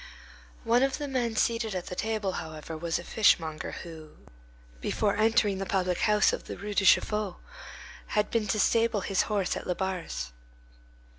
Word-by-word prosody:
One 235 +2 +3
of 270 0 +1
the 295 -1 -4
men 245 -4 -1
seated 230 -2 0
at 180 - -3
the 180 - -6
table, 215 -1 -1
however, 160 -1 -6
was 165 +1 -1
a 175 - -7
fishmonger 160 -7 +2
who, 160 -2 -11 0.6
before 200 - 0
entering 215 -2 +2
the 195 - -2
public 180 -2 0
house 210 -1 +3
of - - -4
the - - -7
Rue 205 +1 -5
de 200 - +1
Chaffaut, 205 +1 +3 0.7
had 210 0 0
been 225 -2 0
to 215 +2 0
stable 225 -1 +2
his 190 0 +1
horse 200 -3 0
at - - -6
Labarre's. 180 - -3
200 Hz, 165 wpm, -28 LUFS, 175-220 Hz, 0.7 s, One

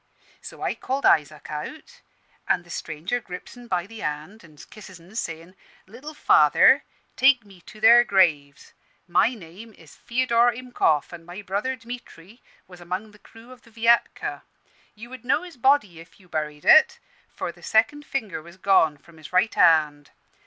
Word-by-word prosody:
So - - -10
I - - -1
called 270 +2 -4
Isaac 150 0 +1
out; 310 - -8 0.5
an' 175 - +1
the 175 - -15
stranger 165 +11 -4
grips 180 -5 -10
'en 245 -1 -13
by 180 -4 -2
the 225 +2 -12
hand 150 +8 -6
an' 155 -3 -18
kisses 190 +1 -13
'en, 175 +6 -18
sayin', 165 -3 -6 0.3
'Little 260 +10 -11
father, - - +5 0.3
take 260 -3 +4
me 195 -3 -18
to 215 - -13
their 235 +2 +7
graves. 160 -9 0 0.3
My 225 +7 +2
name 205 +4 -13
is - - -18
Feodor 240 -1 +1
Himkoff, 235 - -1
an' 170 -1 -10
my 175 +4 -10
brother 205 +8 -2
Dmitry 230 -4 -12 0.3
was 180 -1 -15
among 185 +5 -5
the 210 - -20
crew 225 +4 -17
of 255 -1 -15
the 230 - -21
Viatka. 230 +1 0 0.5
You 230 +3 -12
would 260 -3 -10
know 250 - 0
his 355 -3 -11
body, 240 - +2
if 165 +3 -16
you 185 - -21
buried 150 -3 -5
it, 315 - +6 0.3
for - - -6
the - - -21
second 260 +7 +1
finger 220 - -4
was 170 +3 -15
gone 185 -6 +3
from 165 +3 -20
his 155 - -13
right 185 +5 +2
hand. 150 -4 +3
200 Hz, 175 wpm, -24 LUFS, 165-240 Hz, 0.5 s, their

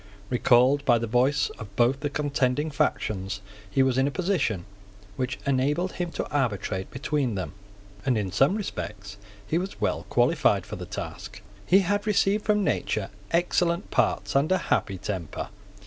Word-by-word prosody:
Recalled 125 +3 +4
by 120 - +4
the 115 - -2
voice 125 +5 +2
of 100 -3 -9
both 125 +4 +3
the 145 0 -2
contending 145 0 0
factions, 100 -7 -1 0.3
he 135 +7 +3
was 130 -1 +2
in 135 - +3
a - - +2
position 145 - 0 0.5
which 130 +3 -2
enabled 145 +7 +1
him 175 -1 -3
to - - -3
arbitrate 105 -8 -1
between 135 -3 -1
them; 95 - -4 0.5
and 125 0 +2
in 100 -3 -2
some 135 - +3
respects 105 - -5 0.3
he 160 +10 0
was 190 +2 -5
well - - -1
qualified - - +3
for - - -6
the - - -7
task. - - -7 0.2
He 190 +2 +6
had 205 +3 0
received 210 0 +2
from 210 -1 +3
nature 110 - -1 0.2
excellent 170 0 +1
parts - - +1
and 140 +5 +2
a 185 - +5 0.2
happy 95 - 0
temper. 90 -4 -4
135 Hz, 165 wpm, -26 LUFS, 110-170 Hz, 0.5 s, He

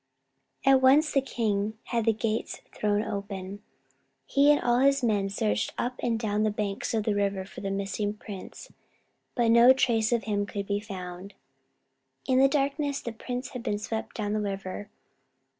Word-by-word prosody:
At 270 -1 +6
once 285 +4 +5
the 275 - +3
king 220 -4 -1
had 230 -2 -1
the 225 - +5
gates 220 0 -3
thrown 210 0 0
open. 200 -1 -5 0.6
He 285 +1 +4
and 295 - +4
all 240 0 +2
his 275 0 +3
men 205 -4 +1
searched 105 - -1
up 245 - -1
and 230 -2 0
down 210 -2 0
the 215 - +3
banks 205 +1 -2
of 220 - +1
the 215 - +1
river 200 -1 -1
for - - -10
the 195 - -3
missing 200 +1 -2
prince. 205 -2 -10 0.6
But 235 -2 +3
no 235 +2 +8
trace 230 -4 +1
of 235 -1 +1
him 205 -2 -1
could 200 -1 -4
be 200 0 -1
found. 190 -1 -8 0.9
In 260 -1 +3
the 270 - +7
darkness 280 0 0
the 235 - -5
prince 250 +3 -5
had 250 - -6
been 205 -3 -1
swept 220 +1 -5
down 210 -2 -2
the 215 - 0
river. 195 0 -5
215 Hz, 175 wpm, -27 LUFS, 200-245 Hz, 0.9 s, no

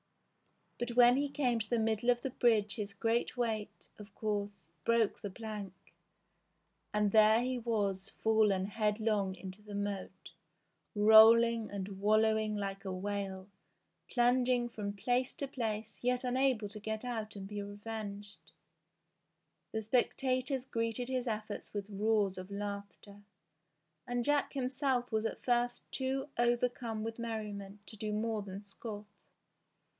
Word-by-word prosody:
But 240 0 -2
when 245 0 +7
he 285 +1 0
came 250 -5 +1
to 215 - -4
the 240 - +2
middle 225 +1 +1
of 240 0 +3
the 270 - -2
bridge 220 -5 +3
his 205 -3 -5
great 230 +4 0
weight, 225 -3 -2
of 210 +1 -12
course, 205 -5 -3
broke 230 0 +2
the 205 - -4
plank, 210 -2 -6 1.2
and 210 -1 +2
there 220 +2 +6
he 255 0 -1
was 205 -5 -1
fallen 215 -4 +3
headlong 210 -2 0
into 190 +2 -9
the 210 -1 -8
moat, 200 -1 -4 0.6
rolling 220 +2 +7
and 195 -1 -5
wallowing 215 0 +3
like 195 -1 -4
a 190 - -4
whale, 190 0 -3 0.6
plung 245 0 +3
ing 245 -1 +2
from 205 -3 -4
place 245 +5 0
to 280 - -3
place 220 -4 -4
yet 250 +1 +1
unable 255 -3 +1
to 215 +1 -8
get 220 +2 -4
out 220 -4 -4
and 195 -1 -6
be 205 0 -4
revenged. 205 0 -7 1.2
The 220 0 -2
spectators 255 +3 0
greeted 230 0 -2
his 255 -1 -1
efforts 215 -2 -4
with 200 -1 -2
roars 205 -2 +1
of 185 +1 -8
laughter, 200 0 -6 0.9
and 245 -1 -1
Jack 290 -1 +2
himself 255 -2 0
was 220 0 +1
at - - -8
first 245 0 +1
too 270 +1 -2
overcome 240 -2 +1
with 225 +1 -5
merriment 210 -3 -5
to - - -10
do 215 0 -3
more 215 0 -1
than 200 0 -7
scoff. 205 +1 -8
220 Hz, 140 wpm, -33 LUFS, 205-240 Hz, 1.2 s, when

